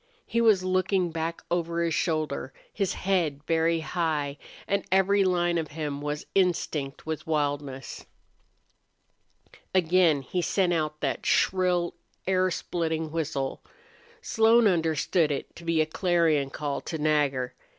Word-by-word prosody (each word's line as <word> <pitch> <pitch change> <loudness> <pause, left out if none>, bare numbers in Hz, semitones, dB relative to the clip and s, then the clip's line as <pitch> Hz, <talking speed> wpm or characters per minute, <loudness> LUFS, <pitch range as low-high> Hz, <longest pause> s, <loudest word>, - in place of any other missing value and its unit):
He 235 +1 0
was 215 -5 +4
looking 185 -1 +1
back 165 +1 -3
over 170 -1 0
his 165 -1 0
shoulder, 155 -6 -1 0.2
his 195 -3 -1
head 170 -7 0
very 165 0 +2
high, 155 -4 -2 0.3
and 200 - 0
every 195 +1 +4
line 175 -2 +1
of 160 - -3
him 145 -2 -3
was 150 +1 -3
instinct 160 -7 0
with 160 0 -4
wildness. 145 -4 -2 1.7
Again 170 -5 +4
he 180 +7 -2
sent 180 0 +1
out 155 -2 -2
that 140 - -2
shrill, 180 -2 +2 0.3
air 185 0 +2
splitting 160 -2 -2
whistle. 150 -4 -2 0.6
Slone 225 +1 +4
understood 165 -2 +2
it 140 - -4
to 170 - -11
be 165 -1 +2
a - - +2
clarion 160 -4 +1
call 145 0 -3
to 160 - -5
Nagger. 145 -4 +1
165 Hz, 130 wpm, -27 LUFS, 150-180 Hz, 1.7 s, was